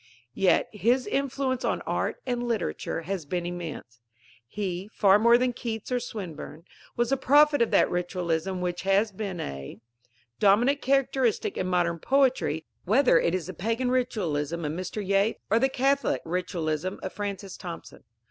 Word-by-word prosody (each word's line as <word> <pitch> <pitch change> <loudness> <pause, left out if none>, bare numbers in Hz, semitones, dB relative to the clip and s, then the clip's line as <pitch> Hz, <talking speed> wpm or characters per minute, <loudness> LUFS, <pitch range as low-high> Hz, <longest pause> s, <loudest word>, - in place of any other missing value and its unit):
Yet 190 +5 +3
his 235 +5 +2
influence 265 +2 -1
on - - 0
art - - -2
and 245 -1 -1
literature 230 -7 -2
has 185 0 -3
been 175 +2 -2
immense. 165 -9 -6 0.5
He, 190 - -4
far 200 -1 +5
more 235 +2 +6
than 250 0 0
Keats 225 -1 -5
or 250 - +2
Swinburne, 185 -8 -7 0.3
was 240 +1 +1
the 275 - +3
prophet 290 +2 +5
of 235 - +3
that - - +4
ritualism 175 0 -2
which 175 -1 -2
has 195 +3 +2
been 195 -3 -5
a; 70 - -6 0.6
dominant 240 +8 +4
characteristic 260 -5 +1
in 185 - -2
modern 175 -2 +1
poetry, 260 - +1 0.2
whether 220 -3 +4
it 170 - +1
is 185 - -3
the 185 - -6
Pagan 230 +8 -1
ritualism 170 - -1
of 150 - -1
Mr. 185 +5 -4
Yeats 200 +3 +2
or 225 - +5
the 265 - +3
Catholic 275 +2 +1
ritualism 170 -1 -2
of 190 - -4
Francis 200 -2 -5
Thompson. 170 -2 -9
200 Hz, 155 wpm, -27 LUFS, 175-245 Hz, 0.6 s, more